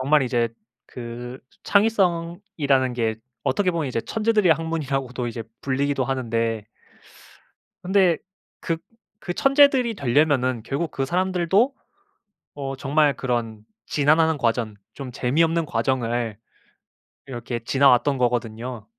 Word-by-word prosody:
정말 145 Hz, +3 st, +3 dB
이제 120 Hz, -2 st, +1 dB, 0.4 s
그 120 Hz, +1 st, -7 dB, 0.3 s
창의성이라는 170 Hz, -, +1 dB
게 115 Hz, -2 st, 0 dB, 0.3 s
어떻게 180 Hz, +8 st, +1 dB
보면 165 Hz, -4 st, -2 dB
이제 120 Hz, -2 st, -1 dB
천재들의 215 Hz, -, +2 dB
학문이라고도 140 Hz, -6 st, -2 dB
이제 115 Hz, 0 st, -5 dB, 0.2 s
불리기도 140 Hz, 0 st, 0 dB
하는데, 115 Hz, -4 st, -1 dB, 1.2 s
근데 185 Hz, -2 st, +3 dB, 0.4 s
그 165 Hz, -, -1 dB, 0.5 s
그 175 Hz, -, -2 dB
천재들이 275 Hz, -3 st, +4 dB
되려면은 130 Hz, -, +1 dB
결국 145 Hz, +5 st, -2 dB
그 135 Hz, -, -2 dB
사람들도 185 Hz, -, +2 dB, 0.8 s
어 135 Hz, -1 st, -4 dB
정말 145 Hz, +2 st, +2 dB
그런 115 Hz, -4 st, -3 dB, 0.2 s
지난한 155 Hz, +2 st, +3 dB
과정, 115 Hz, -4 st, 0 dB, 0.2 s
좀 130 Hz, -3 st, -8 dB
재미없는 165 Hz, +7 st, +1 dB
과정을 120 Hz, -3 st, -1 dB, 0.9 s
이렇게 120 Hz, -2 st, -5 dB
지나왔던 135 Hz, +1 st, +4 dB
거거든요. 120 Hz, -1 st, -2 dB
135 Hz, 270 characters per minute, -23 LUFS, 120-165 Hz, 1.2 s, 천재들이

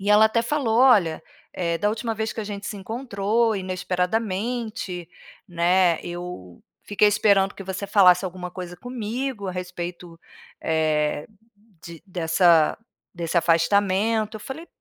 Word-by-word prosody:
E 200 Hz, +2 st, -1 dB
ela 210 Hz, +1 st, +7 dB
até 220 Hz, +1 st, +1 dB
falou: 235 Hz, -3 st, 0 dB
"Olha, 200 Hz, -12 st, +4 dB, 0.3 s
eh, 170 Hz, -2 st, -1 dB
da 205 Hz, -, +1 dB
última 225 Hz, +1 st, -3 dB
vez 220 Hz, 0 st, -3 dB
que -, -, -5 dB
a -, -, -4 dB
gente 205 Hz, 0 st, -6 dB
se 210 Hz, -, -5 dB
encontrou, 220 Hz, +1 st, -1 dB
inesperadamente, 190 Hz, +2 st, -2 dB, 0.4 s
né, 175 Hz, 0 st, +2 dB
eu 175 Hz, -, -8 dB, 0.2 s
fiquei 210 Hz, 0 st, +3 dB
esperando 200 Hz, -2 st, +3 dB
que -, -, -8 dB
você 190 Hz, +1 st, -4 dB
falasse 190 Hz, -2 st, +5 dB
alguma 180 Hz, -1 st, -6 dB
coisa 180 Hz, -1 st, -7 dB
comigo 245 Hz, -1 st, -4 dB
a -, -, -3 dB
respeito, 180 Hz, -1 st, -7 dB, 0.4 s
eh, 155 Hz, -2 st, 0 dB, 0.6 s
de 170 Hz, -2 st, -10 dB
dessa 170 Hz, -2 st, +3 dB, 0.4 s
desse 170 Hz, 0 st, -3 dB
afastamento". 200 Hz, +6 st, +2 dB
Eu -, -, -11 dB
falei 315 Hz, +9 st, -8 dB
190 Hz, 140 wpm, -24 LUFS, 175-220 Hz, 0.6 s, ela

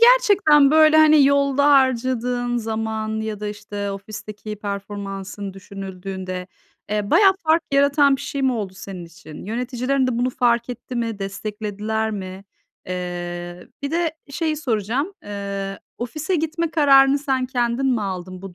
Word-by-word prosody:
gerçekten 410 Hz, -, +6 dB
böyle, 310 Hz, 0 st, +6 dB
hani, 310 Hz, -2 st, +7 dB
yolda 280 Hz, 0 st, +3 dB
harcadığın 250 Hz, -2 st, +2 dB
zaman 220 Hz, -1 st, -2 dB
ya 220 Hz, -1 st, -4 dB
da 210 Hz, -, -3 dB
işte 205 Hz, -1 st, -5 dB
ofisteki 210 Hz, +1 st, -7 dB
performansın 200 Hz, -1 st, -6 dB
düşünüldüğünde, 190 Hz, -1 st, -6 dB, 0.4 s
eee, 210 Hz, -1 st, -1 dB
bayağı 390 Hz, -2 st, +6 dB
fark 320 Hz, +1 st, +4 dB
yaratan 280 Hz, 0 st, +4 dB
bir -, -, -11 dB
şey 280 Hz, -1 st, -4 dB
mi 265 Hz, -, +3 dB
oldu 210 Hz, -5 st, -3 dB
senin 190 Hz, -3 st, -8 dB
için? 165 Hz, -2 st, -12 dB
Yöneticilerin 250 Hz, +4 st, -1 dB
de 245 Hz, -2 st, -1 dB
bunu 250 Hz, +1 st, +1 dB
fark 240 Hz, -2 st, +1 dB
etti 245 Hz, +1 st, -8 dB
mi? 230 Hz, -3 st, -2 dB
Desteklediler 210 Hz, +2 st, -3 dB
mi? 190 Hz, -2 st, -6 dB, 0.4 s
Eee, 175 Hz, 0 st, -5 dB
bir 280 Hz, -, -2 dB
de 335 Hz, 0 st, 0 dB, 0.2 s
bir -, -, -13 dB
şeyi 315 Hz, 0 st, -1 dB
soracağım, 250 Hz, -, -1 dB
eee, 200 Hz, -1 st, -5 dB, 0.2 s
ofise 300 Hz, +9 st, -3 dB
gitme 325 Hz, +1 st, -1 dB
kararını 275 Hz, -3 st, +5 dB
sen 265 Hz, -3 st, -1 dB
kendin 245 Hz, 0 st, 0 dB
mi 245 Hz, -5 st, +1 dB
aldın 185 Hz, -1 st, -5 dB
bu 195 Hz, -2 st, -9 dB
225 Hz, 145 wpm, -22 LUFS, 200-275 Hz, 0.4 s, hani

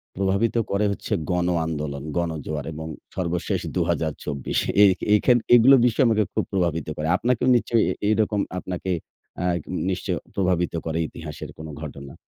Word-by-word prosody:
প্রভাবিত 100 Hz, +5 st, +1 dB, 0.2 s
করে 100 Hz, +2 st, +2 dB
হচ্ছে 100 Hz, -, -4 dB, 0.2 s
গণ 90 Hz, 0 st, +1 dB, 0.2 s
আন্দোলন, 75 Hz, -3 st, -4 dB
গনজোয়ার 80 Hz, -3 st, -3 dB
এবং 80 Hz, +1 st, -6 dB, 0.3 s
সর্বশেষ 90 Hz, -1 st, -1 dB, 0.2 s
২০২৪। 80 Hz, -5 st, -1 dB, 0.2 s
এ -, -, +10 dB, 0.3 s
এখান 120 Hz, +3 st, +4 dB, 0.2 s
এগুলো 125 Hz, +3 st, +8 dB
বিষয় 125 Hz, +3 st, +3 dB
আমাকে 110 Hz, -1 st, +3 dB
খুব -, -, +1 dB
প্রভাবিত 85 Hz, -5 st, 0 dB
করে। 75 Hz, +1 st, -2 dB
আপনাকেও 125 Hz, +2 st, +1 dB
নিশ্চয়ই 115 Hz, -1 st, +2 dB, 0.3 s
এরকম 110 Hz, -1 st, +2 dB, 0.2 s
আপনাকে 95 Hz, +1 st, -4 dB, 0.6 s
আগ 85 Hz, -1 st, +1 dB, 0.3 s
নিশ্চই -, -, -2 dB, 0.2 s
প্রভাবিত 90 Hz, -3 st, +1 dB
করে 80 Hz, 0 st, -2 dB
ইতিহাসের 75 Hz, -2 st, -8 dB
কোন 80 Hz, 0 st, -8 dB
ঘটনা? 70 Hz, -2 st, -8 dB
85 Hz, 135 wpm, -24 LUFS, 80-105 Hz, 0.6 s, এ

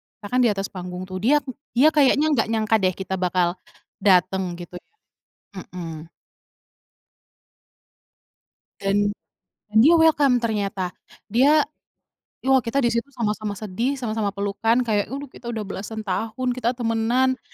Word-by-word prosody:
kita 205 Hz, -, -14 dB
kan 250 Hz, -, +2 dB
di -, -, +4 dB
atas 195 Hz, 0 st, -3 dB
panggung 180 Hz, -1 st, -7 dB
tuh. 185 Hz, -, -4 dB
Dia 295 Hz, +5 st, +4 dB, 0.3 s
dia 270 Hz, +6 st, +6 dB
kayaknya 285 Hz, +1 st, +4 dB
enggak 255 Hz, -7 st, +2 dB
nyangka 220 Hz, 0 st, +2 dB
deh 185 Hz, 0 st, +3 dB
kita 190 Hz, 0 st, -3 dB
bakal 180 Hz, 0 st, 0 dB, 0.5 s
dateng, 190 Hz, 0 st, +4 dB, 0.2 s
gitu 175 Hz, 0 st, -9 dB
ya, 305 Hz, -, -18 dB, 0.7 s
mhm. 165 Hz, -2 st, -8 dB, 2.7 s
Dan, 205 Hz, +1 st, +1 dB, 0.7 s
dia 290 Hz, +10 st, +7 dB
welcome 290 Hz, -6 st, +4 dB
ternyata. 200 Hz, -5 st, -2 dB, 0.4 s
Dia 280 Hz, +7 st, +5 dB, 0.8 s
wah, 265 Hz, 0 st, +4 dB
kita 230 Hz, +5 st, -2 dB
di 235 Hz, -, +2 dB
situ 235 Hz, +4 st, -1 dB
sama-sama 215 Hz, -5 st, -3 dB
sedih, 225 Hz, +7 st, -2 dB
sama-sama 220 Hz, -4 st, -2 dB
pelukan, 225 Hz, +5 st, +1 dB
kayak 210 Hz, -3 st, 0 dB, 0.2 s
kita 235 Hz, -, -10 dB
udah 225 Hz, -3 st, -3 dB
belasan 210 Hz, +2 st, -6 dB
tahun, 225 Hz, +6 st, -2 dB
kita 245 Hz, 0 st, -1 dB
temenan 240 Hz, +3 st, +1 dB
220 Hz, 130 wpm, -23 LUFS, 195-250 Hz, 2.7 s, dia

